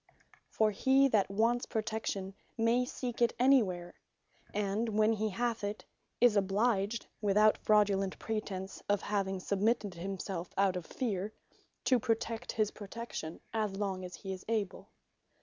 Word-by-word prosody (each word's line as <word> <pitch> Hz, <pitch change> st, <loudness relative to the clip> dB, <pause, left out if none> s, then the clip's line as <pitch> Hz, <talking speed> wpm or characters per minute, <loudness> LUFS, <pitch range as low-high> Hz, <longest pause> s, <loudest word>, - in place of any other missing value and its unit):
For 215 Hz, -1 st, +2 dB
he 265 Hz, +6 st, +4 dB
that 210 Hz, -6 st, +2 dB
wants 230 Hz, +4 st, +1 dB
protection, 215 Hz, -4 st, -2 dB, 0.2 s
may 235 Hz, +2 st, +3 dB
seek 245 Hz, -2 st, -5 dB
it 235 Hz, -, +4 dB
anywhere; 205 Hz, -10 st, +3 dB, 0.6 s
and 210 Hz, +2 st, -1 dB
when 215 Hz, +1 st, +4 dB
he 215 Hz, 0 st, 0 dB
hath 230 Hz, +2 st, -1 dB
it, 205 Hz, +1 st, -4 dB, 0.3 s
is 240 Hz, -3 st, +5 dB
obliged 205 Hz, +2 st, +1 dB, 0.2 s
(without 210 Hz, +1 st, +4 dB
fraudulent 200 Hz, -2 st, +2 dB
pretence 200 Hz, -3 st, -4 dB
of 205 Hz, -1 st, +2 dB
having 195 Hz, -2 st, -1 dB
submitted 205 Hz, +1 st, 0 dB
himselfe 185 Hz, 0 st, -5 dB
out 195 Hz, -1 st, +3 dB
of 180 Hz, -2 st, -5 dB
fear,) 210 Hz, -5 st, -2 dB, 0.5 s
to 255 Hz, -2 st, +4 dB
protect 230 Hz, 0 st, -1 dB
his 215 Hz, -2 st, +1 dB
Protection 205 Hz, -6 st, -7 dB
as 215 Hz, -3 st, 0 dB
long 195 Hz, -2 st, -2 dB
as 180 Hz, -1 st, -7 dB
he 195 Hz, -2 st, -5 dB
is 185 Hz, -, -8 dB
able. 215 Hz, -4 st, -2 dB
210 Hz, 140 wpm, -32 LUFS, 195-230 Hz, 0.6 s, is